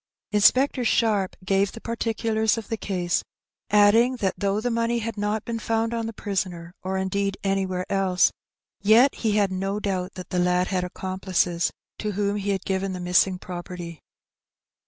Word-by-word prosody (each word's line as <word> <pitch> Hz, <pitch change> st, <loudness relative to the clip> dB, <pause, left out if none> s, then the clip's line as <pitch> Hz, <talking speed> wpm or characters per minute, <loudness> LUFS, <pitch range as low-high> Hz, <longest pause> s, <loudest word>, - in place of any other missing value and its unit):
Inspector 255 Hz, +5 st, +4 dB
Sharp 210 Hz, -5 st, +2 dB
gave 195 Hz, 0 st, +2 dB
the -, -, -8 dB
particulars 225 Hz, -1 st, 0 dB
of 225 Hz, -, -6 dB
the 225 Hz, -, -1 dB
casej 180 Hz, -3 st, 0 dB, 0.5 s
add 205 Hz, 0 st, +6 dB
ing 240 Hz, +3 st, +4 dB
that 195 Hz, -6 st, 0 dB
though 200 Hz, 0 st, 0 dB
the 245 Hz, +2 st, -1 dB
money 230 Hz, +1 st, +1 dB
had 230 Hz, -1 st, -3 dB
not 210 Hz, +1 st, -2 dB
been 230 Hz, -1 st, -3 dB
found 225 Hz, +1 st, 0 dB
on 230 Hz, -1 st, -2 dB
the -, -, -4 dB
prisoner, 185 Hz, -5 st, -4 dB
or 190 Hz, +1 st, -2 dB
indeed 195 Hz, +1 st, -1 dB
anywhere 190 Hz, -2 st, -1 dB
else, 190 Hz, -3 st, +2 dB, 0.5 s
yet 225 Hz, +7 st, +6 dB
he 220 Hz, -3 st, -1 dB
had 205 Hz, -2 st, +2 dB
no 195 Hz, +2 st, -2 dB
doubt 190 Hz, -2 st, -3 dB
that 185 Hz, -, -9 dB
the 180 Hz, -, 0 dB
lad 180 Hz, 0 st, +2 dB
had 185 Hz, -2 st, 0 dB
accompUces 185 Hz, -1 st, -1 dB, 0.3 s
to 210 Hz, -1 st, -2 dB
whom 205 Hz, +1 st, 0 dB
he 200 Hz, 0 st, -3 dB
had 195 Hz, -2 st, -1 dB
given 190 Hz, 0 st, -1 dB
the 180 Hz, -, -5 dB
missing 180 Hz, +1 st, +3 dB
property. 175 Hz, -2 st, -7 dB
200 Hz, 175 wpm, -25 LUFS, 185-220 Hz, 0.5 s, add